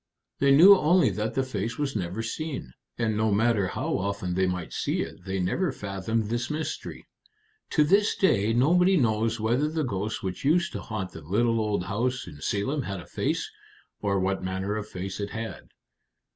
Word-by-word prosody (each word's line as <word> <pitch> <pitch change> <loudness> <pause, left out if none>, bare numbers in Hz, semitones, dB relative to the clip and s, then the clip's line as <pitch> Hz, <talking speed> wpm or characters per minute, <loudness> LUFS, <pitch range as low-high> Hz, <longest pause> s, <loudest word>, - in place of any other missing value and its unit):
They 140 - +3
knew 170 +9 +9
only 180 0 +4
that 110 +1 -3
the 135 - +2
face 115 -2 -3
was 145 -3 -2
never 95 +2 -2
seen. 130 - -5 0.2
And 110 -2 0
no 110 0 +1
matter 105 -1 +2
how - - -2
often 100 -2 -2
they 95 +1 +2
might 90 -2 -3
see - - -1
it, 90 - -7
they 95 0 -2
never 140 - 0
fathomed 105 0 -2
this 120 +1 -1
mystery. 155 +1 -4 0.6
To 150 - +4
this 200 +7 +3
day 110 - +2
nobody 180 +10 +4
knows 115 -3 +1
whether 120 +7 +1
the 160 0 -1
ghost 105 -3 -3
which 95 -1 -4
used 170 +5 +2
to - - -4
haunt 100 -4 -4
the 80 - -10
little 115 +8 +1
old 105 -4 0
house 125 +7 -1
in 75 0 -11
Salem 135 +9 -1
had 95 -5 -4
a 85 - -10
face, - - -2 0.5
or 100 -1 0
what 95 +1 0
manner 95 +2 -2
of 105 -1 -4
face 95 +2 -5
it 100 0 -3
had." 115 +1 -6
110 Hz, 185 wpm, -27 LUFS, 95-135 Hz, 0.6 s, knew